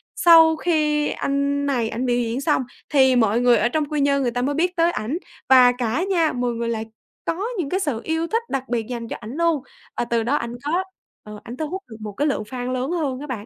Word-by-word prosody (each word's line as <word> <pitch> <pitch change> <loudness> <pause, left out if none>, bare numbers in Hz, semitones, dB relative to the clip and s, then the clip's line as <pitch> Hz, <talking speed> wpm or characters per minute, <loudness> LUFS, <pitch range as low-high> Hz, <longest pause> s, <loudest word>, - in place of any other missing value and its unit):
sau 325 -2 +7
khi 300 -3 +1
anh 280 0 -1
này 245 -5 0
ảnh 240 +4 -3
biểu 245 -1 +1
diễn 235 +2 -2
xong 270 - +1 0.3
thì 265 -3 +4
mọi 225 -2 +3
người 245 -1 +5
ở 240 - +2
trong 305 +3 0
Quy 300 0 -2
Nhơn 280 0 +2
người 245 -3 0
ta 245 +1 -2
mới 280 +3 -1
biết 355 +3 0
tới 335 0 +3
ảnh 260 +2 -3 0.3
và 255 -2 +8
cả 245 +6 -1
nha, 335 -5 +2
mọi 245 -1 -1
người 230 0 -3
lại 225 -1 -2 0.4
có 365 +5 -2
những 325 -7 -2
cái 375 - 0
sự 290 - -2
yêu 320 +1 -1
thích 455 +5 0
đặc 270 -2 -2
biệt 230 -2 -1
dành 235 -2 -5
cho - - -5
ảnh 225 +2 -7
luôn, 335 -4 +1 0.3
và - - 0
từ 235 -1 0
đó 255 +6 +1
ảnh 235 -4 -3
có 345 +5 +1 0.4
ờ, 210 0 -10
ảnh 240 +2 -8
thu 310 - -3
hút 380 +3 -5
được 220 - -10
một 215 -1 -5
cái 290 +9 0
lượng 275 -7 -1
fan 245 +3 -5
lớn 255 +4 -2
hơn 290 -7 -2
á 295 - -7
bạn. 225 -6 -5
270 Hz, 255 wpm, -22 LUFS, 240-315 Hz, 0.4 s, và